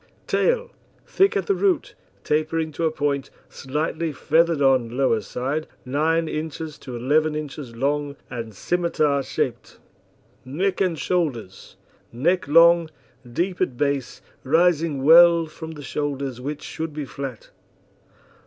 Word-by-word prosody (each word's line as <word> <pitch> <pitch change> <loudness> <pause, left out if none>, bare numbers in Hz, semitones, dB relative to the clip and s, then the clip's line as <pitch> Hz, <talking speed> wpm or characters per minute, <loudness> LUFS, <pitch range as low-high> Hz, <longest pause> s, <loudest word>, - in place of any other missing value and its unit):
TAIL 485 0 +1 0.3
Thick 390 +1 +2
at - - -1
the 400 - +2
root, 385 -2 0 0.3
tapering 155 +1 0
to 165 +2 -2
a - - +3
point, 145 -3 -1 0.2
slightly 155 +4 -3
feathered 160 +2 +2
on 130 -3 +2
lower 130 -5 +2
side, 135 +9 -3 0.2
9 160 +5 +1
inches 155 0 -5
to 125 - -8
11 150 +6 +1
inches 145 -5 -6
long 145 +3 -1
and 115 -4 -7
scimitar 155 - 0
shaped. - - -3 0.7
NECK 180 +10 -1
AND 180 -4 +1
SHOULDERS 135 - -3 0.4
Neck 170 +10 0
long, 165 +2 +6 0.4
deep 180 +8 -2
at 130 -10 0
base, 140 -2 -2 0.2
rising 160 -1 +2
well 170 +2 +7
from 160 +1 -9
the 150 -2 -10
shoulders, 140 -4 -3
which 145 +3 -5
should 160 -1 -5
be 150 -2 -4
flat. 135 -4 -7
150 Hz, 130 wpm, -23 LUFS, 135-165 Hz, 0.7 s, well